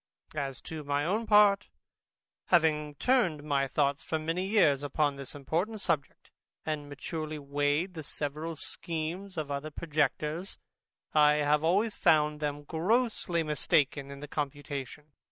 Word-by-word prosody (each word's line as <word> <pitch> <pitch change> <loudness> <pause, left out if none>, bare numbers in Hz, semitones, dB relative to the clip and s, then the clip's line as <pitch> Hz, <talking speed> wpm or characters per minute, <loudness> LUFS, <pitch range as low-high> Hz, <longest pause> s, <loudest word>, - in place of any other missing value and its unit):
As 135 -4 -3
to 160 -2 -7
my 145 0 0
own 215 +6 0
part, 210 -1 +5 0.8
having 155 -4 +2
turned 185 - +2
my 140 -2 +1
thoughts 140 +1 +1
for 160 - -2
many 165 +4 -2
years 170 -10 +4
upon 145 0 0
this 140 0 -7
important 170 +10 -2
subject, 145 -7 -2 0.3
and 150 -2 -3
maturely 155 +2 -5
weighed 145 +5 0
the 160 - -6
several 150 +2 -4
schemes 170 +5 -4
of 150 -2 -3
our 140 +2 -3
projectors, 155 +3 -1 0.6
I 150 -1 +6
have 150 0 +2
always 200 +7 +2
found 150 -3 +3
them 145 -1 -3
grossly 180 - 0
mistaken 145 -2 +1
in 140 0 -9
their 150 - -6
computation. 145 0 -5
150 Hz, 135 wpm, -30 LUFS, 145-170 Hz, 0.8 s, I